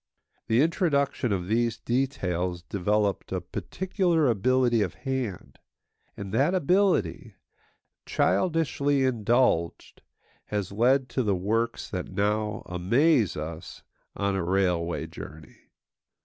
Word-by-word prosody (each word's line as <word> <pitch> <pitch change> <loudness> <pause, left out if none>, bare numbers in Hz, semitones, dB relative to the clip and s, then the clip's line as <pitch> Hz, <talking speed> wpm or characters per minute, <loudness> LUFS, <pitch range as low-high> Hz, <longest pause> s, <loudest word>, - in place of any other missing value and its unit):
The 115 +5 +4
introduction 140 - +1
of 90 -3 -1
these 115 +2 +1
details 90 -9 -2
developed 100 +3 -1
a 95 - -1
particular 175 - -1
ability 120 +1 +2
of 90 -5 -2
hand; 125 -2 -4 0.6
and 100 -1 -7
that 145 +11 +2
ability, 180 - +1 0.7
childishly 145 - +1
indulged, 120 -7 +1 0.4
has 100 -3 -3
led 125 +6 +2
to 130 - -1
the 105 -5 +1
works 115 +6 -1
that 90 -2 -4
now 105 +1 -1
amaze 115 - +2
us 80 +3 -7 0.3
on 100 -1 -1
a 95 - -1
railway 90 -2 0
journey. 75 -2 -12
110 Hz, 105 wpm, -27 LUFS, 95-135 Hz, 0.7 s, The